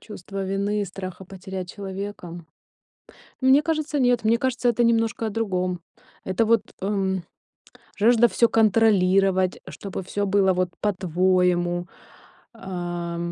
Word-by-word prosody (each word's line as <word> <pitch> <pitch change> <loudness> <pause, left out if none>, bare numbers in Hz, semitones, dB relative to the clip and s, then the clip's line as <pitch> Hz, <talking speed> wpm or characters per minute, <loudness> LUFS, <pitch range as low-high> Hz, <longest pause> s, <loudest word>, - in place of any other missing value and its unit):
Чувство 195 -2 -8
вины 200 +2 -1
и - - -1
страха 185 0 -8
потерять 190 -1 -7
человека? 190 -4 -7 1.0
Мне 265 +3 +5
кажется, 310 -2 -1
нет. 245 -2 +2
Мне 225 +2 +3
кажется, 250 -1 0
это 240 +1 +1
немножко 225 -1 +1
о - - -2
другом. 185 -5 -2 0.4
Это 190 +4 0
вот, 230 -1 +3 0.2
эм, 190 -2 -1 0.7
жажда 235 +2 +5
всё 235 0 +2
контролировать, 195 -4 +3
чтобы 195 -1 -6
всё 205 +2 -2
было 195 -1 +3
вот 180 0 0
по-твоему, 180 -2 +1 0.7
а 175 -4 -5
195 Hz, 120 wpm, -24 LUFS, 185-225 Hz, 1.0 s, Мне